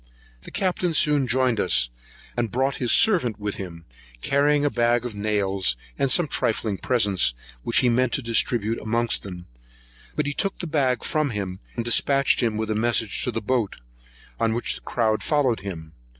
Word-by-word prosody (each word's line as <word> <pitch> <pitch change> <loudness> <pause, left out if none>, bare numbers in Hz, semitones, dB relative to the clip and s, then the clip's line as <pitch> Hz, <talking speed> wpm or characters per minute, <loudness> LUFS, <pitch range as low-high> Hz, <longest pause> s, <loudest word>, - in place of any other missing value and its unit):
The - - -10
Captain 180 -3 -1
soon 145 -3 +3
joined 125 -2 +1
us, 60 -11 +3 0.5
and 120 -2 -1
brought 130 +5 0
his 125 -3 +1
servant 165 - +3
with 105 -1 -3
him, 85 -4 -8 0.4
carrying 145 +1 +2
a 145 - +2
bag 120 0 +1
of 120 - -4
nails, 100 - 0 0.2
and 135 - 0
some 170 +4 +3
trifling 110 -6 -1
presents, 100 - +2 0.3
which 115 - +2
he 125 - +2
meant 125 +1 +2
to 140 - -1
distribute 115 -1 0
amongst 115 +2 0
them; 90 -3 -9 0.7
but 150 - 0
he 145 - -2
took 195 +5 -2
the - - -5
bag 140 -6 0
from 155 -2 0
him, 95 -5 -4 0.2
and 115 - -3
dispatched 135 +4 +3
him 115 -3 0
with 110 0 -2
a - - +2
message 115 -1 +1
to - - -1
the - - -4
boat, 115 -2 0 0.6
on 115 -1 +1
which 120 - -1
the - - -8
crowd 110 -3 0
followed 140 -7 +1
him. 85 -5 -8
115 Hz, 180 wpm, -24 LUFS, 105-135 Hz, 0.7 s, soon